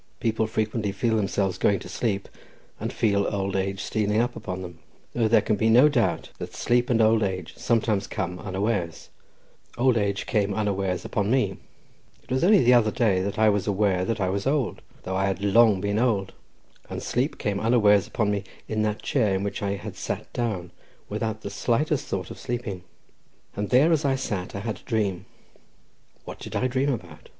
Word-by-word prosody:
People 110 -1 0
frequently 110 -1 -1
feel 110 +3 0
themselves 100 -2 0
going 100 - +3
to - - -9
sleep, 100 -4 -2 0.5
and - - -3
feel 100 -2 +1
old 100 -1 -2
age 95 0 -1
stealing 105 -1 0
upon 95 -6 -2
them; 85 -2 -9 0.3
though 115 -2 +2
there 115 - +4
can 110 - +1
be 110 +2 +2
no 125 +6 +7
doubt 125 -6 0
that - - -7
sleep 120 +1 +1
and 120 -2 +3
old 110 0 +4
age 95 -4 -2
sometimes 110 -4 0
come 90 -2 -4
unawares—old 105 +5 -3
age 100 -1 -1
came 100 -3 0
unawares 100 -4 -1
upon 105 0 -1
me; 110 -7 +1 0.7
it - - -16
was 130 +3 +1
only 200 +2 +6
the 125 +1 +6
other 115 -3 +5
day 105 -5 +2
that 100 +1 -3
I 110 0 +5
was 100 -2 0
aware 100 -2 +1
that 110 +3 -2
I 95 -2 +1
was 100 +5 -2
old, 135 -4 0 0.2
though 95 - -3
I 95 +1 +1
had 95 +1 -2
long 105 0 +5
been 100 +2 0
old, 105 -6 +1 0.6
and - - -5
sleep 130 +5 -1
came 100 -1 -1
unawares 105 -4 +4
upon 105 -2 0
me 100 -1 -1 0.2
in 110 -1 -1
that 105 0 -1
chair 110 -8 +1
in 95 - -1
which 100 +2 -3
I 100 -1 -1
had 95 - -7
sat - - -5
down 100 -8 -2 0.4
without 110 +1 -3
the - - -6
slightest 145 +5 0
thought 90 -3 -3
of - - -9
sleeping. 120 -7 -4 0.7
And 105 0 -3
there 140 +7 +5
as 160 -3 +2
I 135 -2 +2
sat 100 -9 -4
I 100 - -4
had 110 0 -3
a - - -22
dream—what 100 -5 -6
did - - -8
I - - +1
dream 130 +2 +1
about? 90 - -7
105 Hz, 190 wpm, -25 LUFS, 95-115 Hz, 0.7 s, no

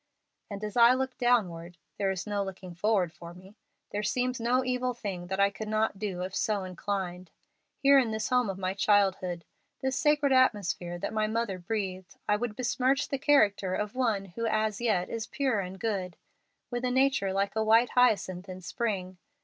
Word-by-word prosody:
And 200 0 -6
as 210 -1 -4
I 240 +1 +7
look 260 0 -2
downward 180 -9 +1 0.2
there 195 -1 +1
is 190 -2 -3
no 205 -1 -1
looking 190 -2 -8
forward 180 -2 +1
for 170 0 -11
me 185 +2 -14 0.4
there 205 - -2
seems 250 +3 -1
no 245 +3 +2
evil 250 0 -1
thing 190 -6 -5
that 190 +1 -3
I 200 0 +4
could 215 +2 -7
not 215 -2 0
do 190 -4 -3
if 190 +1 -5
so 210 -3 0
inclined. 185 -1 -4 0.5
Here 275 0 +6
in 245 -4 +1
this 220 0 -2
home 250 -4 +2
of 190 - -4
my 185 0 -2
childhood, 190 -4 +1 0.4
this 265 0 0
sacred 295 -2 +2
atmosphere 195 -8 +1
that 175 - -4
my 215 0 +1
mother 220 -4 -2
breathed, 185 -1 -4
I 210 - +3
would 210 0 -3
besmirch 255 +3 +1
the 275 - -2
character 205 -10 +3
of 210 0 -3
one 225 -6 0
who 210 +5 -4
as 215 -1 0
yet 210 -7 +1
is 230 -1 -4
pure 265 -7 0
and 190 0 -5
good, 195 -6 -2 0.5
with 245 0 -3
a 250 - +1
nature 260 -6 +2
like 195 +2 -1
a 220 - +1
white 225 +3 +4
hyacinth 200 -6 +2
in 185 0 -7
spring. 185 -2 -3
210 Hz, 190 wpm, -29 LUFS, 185-240 Hz, 0.5 s, I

